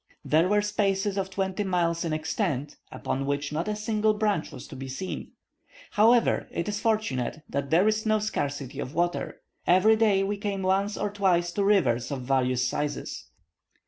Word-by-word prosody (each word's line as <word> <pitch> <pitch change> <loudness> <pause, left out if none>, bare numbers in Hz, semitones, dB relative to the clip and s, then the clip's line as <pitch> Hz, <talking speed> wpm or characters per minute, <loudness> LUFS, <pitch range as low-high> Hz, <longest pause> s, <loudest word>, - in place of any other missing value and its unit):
There 160 +4 +3
were 210 0 +3
spaces 200 -1 0
of 195 -1 -2
twenty 190 +1 -2
miles 170 -3 0
in 165 - -2
extent, 155 - -2 0.2
upon 135 +1 -3
which 145 +1 -2
not 165 +5 -2
a 210 - -1
single 215 0 +1
branch 210 -6 0
was - - -9
to - - -9
be 135 0 -6
seen. 135 +9 -6 0.6
However, 230 +3 +4
it 170 - -3
is 205 0 -2
fortunate 160 - -1
that 140 0 -3
there 175 +6 +4
is 215 0 +1
no 215 0 +2
scarcity 145 -11 -3
of 130 - -5
water; 175 +1 -1 0.2
every 185 +5 +5
day 210 -3 +3
we 205 +1 -1
came 200 -1 -3
once 195 +2 +1
or 205 0 -2
twice 180 -4 +1
to 200 +3 -1
rivers 130 - +2
of 135 -3 -4
various 130 -1 +1
sizes. 145 +2 -3
190 Hz, 175 wpm, -27 LUFS, 145-210 Hz, 0.6 s, every